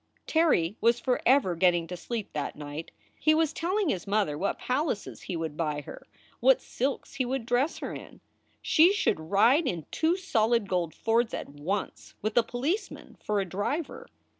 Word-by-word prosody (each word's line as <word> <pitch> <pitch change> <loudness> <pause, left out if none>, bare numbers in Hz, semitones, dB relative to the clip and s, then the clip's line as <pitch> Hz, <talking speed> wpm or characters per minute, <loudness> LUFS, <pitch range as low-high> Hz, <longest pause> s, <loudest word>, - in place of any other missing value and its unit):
Terry 290 - +2
was 235 +1 +4
forever 250 -4 +2
getting 175 -1 +3
to 180 +2 -6
sleep 215 +5 -5
that 145 -2 -3
night. 150 +2 -7 0.3
He 310 0 +4
was 320 -2 +2
telling 370 +2 0
his 185 -6 -2
mother 200 -7 +1
what 190 +7 -1
palaces 255 -4 -2
he 180 - -5
would 160 -2 -3
buy 150 -2 -2
her, - - -11 0.3
what - - +5
silks 265 +2 -3
he 275 - 0
would 255 -1 -2
dress 245 +6 +1
her - - -5
in; - - -10 0.4
she 340 +5 +5
should 395 - +1
ride 220 - +3
in 170 -7 -3
two 325 +3 +1
solid 230 - +1
gold 175 -4 -1
Fords 230 +1 +1
at - - -6
once, 155 +8 -4
with 215 0 -1
a 240 - +6
policeman 270 - -3
for 205 -2 0
driver. 205 - -3
225 Hz, 170 wpm, -28 LUFS, 175-280 Hz, 0.4 s, a